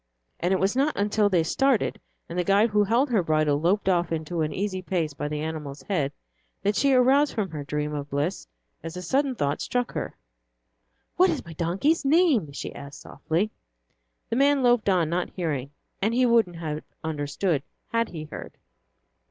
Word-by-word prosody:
And 175 - 0
it 190 - +2
was 195 +4 +1
not 280 +3 +1
until 205 +1 +2
they 175 -4 +3
started 265 +7 +1 0.3
and 170 - -7
the - - +2
guide 200 +5 +3
who 210 0 +4
held 240 +7 +2
her 215 -5 +3
bridle 155 -3 +1
loped 190 +4 +1
off 175 -3 +2
into 165 +1 -2
an 155 -1 0
easy 190 0 -2
pace, 170 -5 -1
by 145 - -4
the 150 0 -3
animal's 150 -3 -5
head, 150 -7 -1 0.5
that 205 +1 +1
she 280 - +3
aroused 265 +3 +4
from 200 -6 -1
her 150 -2 -5
dream 150 +1 -2
of 145 -1 -4
bliss 145 - -2 0.3
as 165 +2 -7
a 180 - -5
sudden 265 - +1
thought 145 -7 -1
struck 245 -1 -1
her. - - -5 1.0
"What 370 +1 +6
is 320 - -2
my 170 - -9
donkey's 185 - +1
name?" 280 - +3
she 140 - -6
asked 140 0 -10
softly. 170 +8 -2 0.8
The 230 - +1
man 280 0 +4
loped 240 -4 +3
on, 180 -4 +3
not 175 +3 -1
hearing, 145 -7 -2 0.3
and 220 +4 +1
he 255 0 +4
wouldn't 230 -7 +3
have 155 -2 -4 0.2
understood 155 +1 -1 0.3
had 230 0 0
he 160 -3 -6
heard. 155 - -8
180 Hz, 185 wpm, -26 LUFS, 155-230 Hz, 1.0 s, What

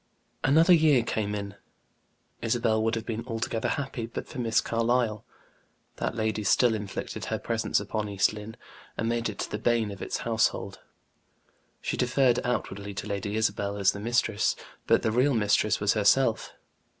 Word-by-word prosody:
Another 160 +6 +5
year 155 -7 +5
came 105 -2 -2
in. 100 -1 -5 0.9
Isabel 115 -1 +1
would 115 +1 +1
have 115 - -4
been 115 -1 -3
altogether 115 -1 -2
happy 135 -6 -3
but 115 - -6
for - - -8
Miss 115 -2 +2
Carlyle; 115 -1 0 0.7
that - - -2
lady 110 -1 -1
still 120 +3 +4
inflicted 105 -2 -5
her - - -2
presence - - 0
upon 105 -1 -3
East 100 +1 +2
Lynne, 105 +1 -8 0.4
and 115 - -1
made 115 -1 0
it 105 - -4
the 105 - -3
bane 115 -2 +1
of 100 - -9
its - - -3
household. - - 0 1.0
She - - -2
deferred 125 0 +3
outwardly 100 -5 -3
to 100 - -5
Lady 100 0 -3
Isabel 100 -2 0
as 100 -2 +3
the 100 - -7
mistress; 110 -1 +1 0.3
but - - +4
the 110 - +1
real 125 +4 +3
mistress 105 0 +2
was 105 0 +2
herself. 110 +3 +2
110 Hz, 160 wpm, -27 LUFS, 105-120 Hz, 1.0 s, Another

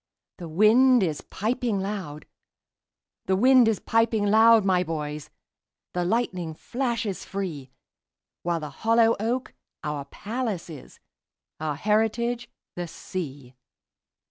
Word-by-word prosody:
The 175 - -6
wind 225 +7 +5
is 155 -5 -2
piping 225 0 -2
loud; 190 -7 -5 1.0
The 190 - +3
wind 250 +3 +6
is 220 -2 +1
piping 225 -2 +1
loud, 220 +1 +6
my 185 -2 +3
boys, 150 -3 -5 0.6
The 180 - 0
lightning 180 -5 -1
flashes 235 - -3
free—While 170 0 -7
the 150 - -5
hollow 230 0 +4
oak 240 +4 -2 0.3
our 150 -2 -3
palace 215 - -4
is, 145 -5 -12 0.6
Our 155 -1 -2
heritage 225 +6 0 0.3
the 175 -1 -4
sea. 145 -7 -7
200 Hz, 110 wpm, -25 LUFS, 165-230 Hz, 1.0 s, wind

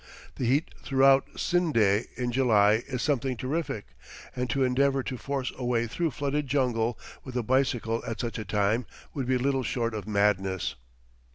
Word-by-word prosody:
The 125 - -1
heat 140 +6 +1
throughout 135 0 +4
Scinde 115 - +2
in 125 -1 -1
July 110 -4 +4
is 125 -2 -3
something 135 -3 0
terrific; 135 -3 -3 0.5
and 125 0 -2
to 135 +1 +1
endeavor 135 +1 +2
to 130 - -4
force 135 +2 -3
a 130 - -7
way 120 -1 +1
through 165 +9 -1
flooded 140 +2 -2
jungle 120 -4 +1 0.3
with 125 -1 -6
a 120 - 0
bicycle 120 -2 +1
at 115 0 -4
such 120 -2 -3
a - - -3
time 105 +4 0 0.3
would 135 -4 -3
be 130 0 +2
little 135 +1 +1
short 115 -2 -1
of 105 -1 -5
madness. 100 -3 +1
125 Hz, 170 wpm, -28 LUFS, 115-135 Hz, 0.5 s, throughout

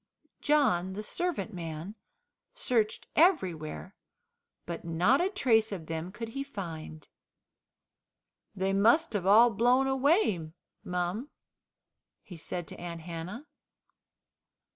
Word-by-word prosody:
John, 190 -12 +2
the 210 +2 -5
servant 350 - -2
man, 165 +2 -6 0.6
searched 220 -3 0
everywhere, 185 - +1 0.7
but 170 -1 -6
not 175 - +2
a 370 - +1
trace 225 - +2
of 180 -5 -5
them 165 +2 -4
could 225 +2 -6
he 275 +4 -4
find. 165 - -8 1.5
"They 190 0 0
must 230 +10 +4
have 190 -3 -1
all 230 +4 +7
blown 245 +5 +3
away, 265 - +1 0.3
mum," 180 +9 -3 0.9
he 180 - -11
said 170 +1 -5
to - - -9
Aunt 170 -1 -6
Hannah. 175 - -7
200 Hz, 110 wpm, -30 LUFS, 170-255 Hz, 1.5 s, all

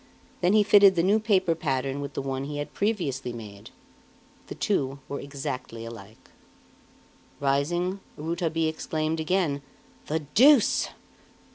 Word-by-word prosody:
Then 180 +2 +3
he 215 -1 +6
fitted 200 -2 +7
the 170 - +2
new 205 +4 +4
paper 190 -5 +2
pattern 135 -3 -2
with 140 -1 -6
the - - -2
one 135 0 -3
he 145 +1 -5
had 145 - -5
previously 150 - -1
made 105 -4 -10 0.8
the - - -7
two 135 -9 -1
were 140 - -4
exactly 130 -4 -6
alike. 110 -2 -12 1.1
Rising, 175 +7 0 0.2
Rouletabille 165 0 -1
exclaimed 155 0 -2
again: 160 -3 0 0.5
"The 160 +1 -1
deuce!" 265 0 +5
155 Hz, 130 wpm, -26 LUFS, 135-185 Hz, 1.1 s, fitted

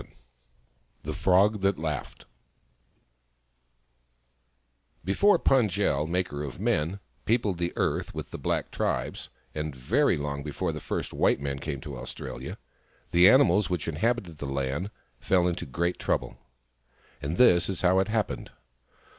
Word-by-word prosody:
VII - - -19 0.9
THE - - -4
FROG 100 +3 +3
THAT 100 0 +2
LAUGHED 75 -4 -4 2.8
BEFORE 175 - +4
Pund 130 -9 +3
jel, 80 -6 0
Maker 85 -4 -2
of 70 -3 -7
Men, 85 +7 0 0.3
peopled 110 -6 +1
the 85 0 -1
earth - - -1
with - - -6
the - - -6
black - - -1
tribes, - - -2 0.2
and 75 -2 -4
very 65 0 +2
long 70 -1 -3
before 75 +4 -2
the 75 - -5
first - - -4
white - - +2
man 70 -1 -3
came 70 -2 -4
to 70 -2 -7
Australia, 65 - -7 0.5
the 90 +2 +7
animals 105 -6 +5
which 90 -4 -2
inhabited 90 -1 -1
the 70 - -4
land 70 +7 -2 0.3
fell 90 -2 +2
into 85 - -2
a - - -12
great 85 +6 -1
trouble. - - -1 0.9
And 75 +5 -3
this 90 -8 +5
is 95 - -3
how 95 +1 +4
it 95 - +1
happened. 110 -1 -2
85 Hz, 145 wpm, -27 LUFS, 75-100 Hz, 2.8 s, the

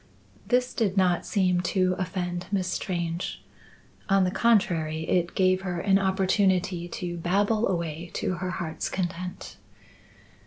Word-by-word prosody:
This 250 0 +2
did 205 -4 0
not 180 -2 +2
seem 180 -3 +2
to 185 +1 +1
offend 180 -1 -3
Miss 190 -3 0
Strange. 175 -2 -3 0.7
On 195 -1 +4
the 180 - +1
contrary 165 -9 +1
it 175 -1 +1
gave 185 0 +3
her 180 -2 -3
an 195 +2 +3
opportunity 190 -2 +1
to 175 0 -5
babble 200 +6 +1
away 170 -2 -3
to - - -1
her 185 +1 -3
heart's 175 -3 -3
content. 180 -1 -4
185 Hz, 130 wpm, -26 LUFS, 175-195 Hz, 0.7 s, On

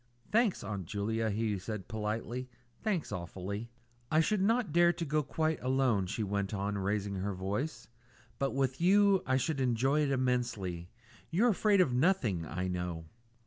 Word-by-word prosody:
"Thanks, 225 -3 +2
Aunt 100 -4 -4
Julia," 110 +3 -1
he 105 -1 -1
said 100 0 -6
politely; 115 +4 -3 0.3
"thanks 200 -8 -1
awfully." 95 +5 -5 0.4
"I 155 - +3
should 190 +5 +2
not 225 -3 +2
dare 170 0 +6
to 170 - -4
go 150 +1 +1
quite 155 +2 -1
alone," 130 -7 +2
she 110 - -2
went 100 0 -2
on, 100 +1 -2
raising 100 0 -1
her 100 +1 -2
voice; 100 - -3 0.5
"but 135 -1 0
with 135 +1 0
you 200 +1 +5
I 130 0 +3
should 140 +1 -1
enjoy 130 +4 +2
it 145 - +1
immensely. 120 -10 -1 0.4
You're 215 +9 +3
afraid 205 -2 +4
of 135 -9 +2
nothing, 125 - +1
I 90 +3 -3
know." 90 -2 -3
120 Hz, 160 wpm, -32 LUFS, 100-155 Hz, 0.5 s, dare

